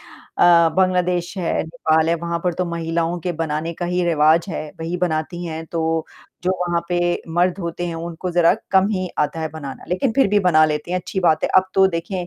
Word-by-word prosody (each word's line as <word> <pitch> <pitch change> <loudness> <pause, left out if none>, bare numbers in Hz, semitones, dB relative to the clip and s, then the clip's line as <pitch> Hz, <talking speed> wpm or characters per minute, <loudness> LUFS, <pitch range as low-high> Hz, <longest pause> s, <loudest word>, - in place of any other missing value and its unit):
अ, 170 -1 +3
बांग्लादेश 180 -1 +1
है, 170 - 0
नेपाल 160 -1 +1
है 170 - +3
वहाँ 170 0 -2
पर 180 -1 +1
तो 180 - -1
महिलाओं 170 +1 -1
के 175 +1 -2
बनाने 160 +1 -2
का 175 - -4
ही 180 +1 0
रिवाज़ 165 +2 +3
है, 155 - -4
वही 165 +2 -3
बनाती 175 0 -2
हैं। 160 -1 -5
तो 160 -1 -1 0.4
जो 185 - +2
वहाँ 175 -1 0
पे 175 -1 0 0.4
मर्द 180 +1 +2
होते 170 -1 -4
हैं 170 - -4
उनको 170 +2 -5
ज़रा 175 -1 +4 0.2
कम 190 +1 +4
ही 185 -3 -2
आता 160 +2 0
है 160 - -2
बनाना 145 -3 -8
लेकिन 185 +8 0
फिर 270 - +5
भी 205 - +3
बना 165 -5 +5
लेते 150 +2 -2
हैं, 180 - +1
अच्छी 190 +1 -4
बात 160 -3 +2
है। - - +1
अब 190 - +6
तो 190 0 +6
देखें, 175 0 -3
170 Hz, 215 wpm, -20 LUFS, 160-180 Hz, 0.4 s, अब